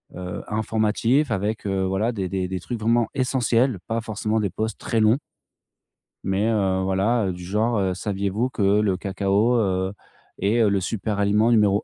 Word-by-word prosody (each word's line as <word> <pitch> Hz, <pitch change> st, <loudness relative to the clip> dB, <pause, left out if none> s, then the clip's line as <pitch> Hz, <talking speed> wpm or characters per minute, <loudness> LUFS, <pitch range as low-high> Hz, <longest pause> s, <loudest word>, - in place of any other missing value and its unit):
heu, 90 Hz, -1 st, -5 dB
informatifs 110 Hz, +5 st, +1 dB
avec, 105 Hz, 0 st, -2 dB
heu, 95 Hz, -1 st, 0 dB
voilà, 95 Hz, +5 st, 0 dB
des 95 Hz, -5 st, -3 dB
des 95 Hz, -1 st, -2 dB
des 95 Hz, 0 st, -4 dB
trucs 115 Hz, +6 st, -5 dB
vraiment 115 Hz, +1 st, +2 dB
essentiels. 125 Hz, -2 st, +1 dB
Pas 115 Hz, 0 st, -1 dB
forcément 110 Hz, 0 st, -2 dB
des 100 Hz, -3 st, 0 dB
posts 110 Hz, +3 st, -4 dB
très 115 Hz, -, 0 dB
longs 110 Hz, +5 st, +4 dB, 1.1 s
mais, 95 Hz, +3 st, +1 dB
heu, 95 Hz, -4 st, +1 dB
voilà, 100 Hz, +4 st, +1 dB
heu, 95 Hz, -, -1 dB
du 90 Hz, 0 st, -9 dB
genre, 110 Hz, +5 st, 0 dB
heu: 95 Hz, -1 st, 0 dB
«Saviez-vous 100 Hz, +5 st, -2 dB
que 120 Hz, -, -5 dB
le 100 Hz, 0 st, +3 dB
cacao, 100 Hz, +5 st, +1 dB
heu, 95 Hz, -3 st, 0 dB, 0.5 s
est, 105 Hz, +4 st, +1 dB
heu, 110 Hz, -, +4 dB
le 100 Hz, -1 st, +1 dB
super 105 Hz, +2 st, -3 dB
aliment 105 Hz, +3 st, +3 dB
numéro 105 Hz, -3 st, +3 dB
105 Hz, 180 wpm, -23 LUFS, 95-115 Hz, 1.1 s, longs